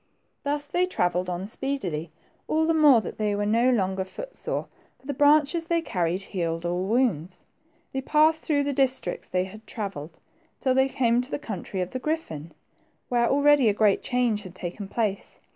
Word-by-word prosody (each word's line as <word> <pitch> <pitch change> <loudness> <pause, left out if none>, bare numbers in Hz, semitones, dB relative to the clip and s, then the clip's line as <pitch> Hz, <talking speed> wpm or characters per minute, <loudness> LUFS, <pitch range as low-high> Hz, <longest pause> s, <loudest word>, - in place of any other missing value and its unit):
Thus 290 0 -1
they 355 +5 0
travelled 180 - 0
on 180 +1 -3
speedily, 200 - -3 0.4
all 315 +1 +2
the 330 - +2
more 295 -7 +6
that - - -8
they 210 -1 +1
were 205 0 -1
no 230 +4 +3
longer 190 -5 +1
foot - - -9
sore, - - -2 0.3
for - - -26
the 285 - -3
branches 300 +4 +3
they 335 -1 +1
carried 180 - -1
healed 170 -3 -3
all 175 +2 -1
wounds. 200 - 0 0.5
They 265 - -1
passed 310 +3 +3
through 285 -2 +2
the 285 0 -1
districts 260 -9 0
they 180 0 +1
had 215 +4 -11
travelled 170 -7 -6 0.4
till 260 -2 +2
they 265 +1 +3
came 240 -2 +2
to 250 - -8
the - - -2
country 195 - -5
of 180 - -3
the 255 - -3
griffin, 210 - -4 0.6
where 240 -1 +2
already 285 -3 +5
a 205 - 0
great 210 -2 +3
change 245 -4 0
had 185 -3 -11
taken 185 +3 -6
place. 205 -2 -2
230 Hz, 185 wpm, -26 LUFS, 185-285 Hz, 0.6 s, more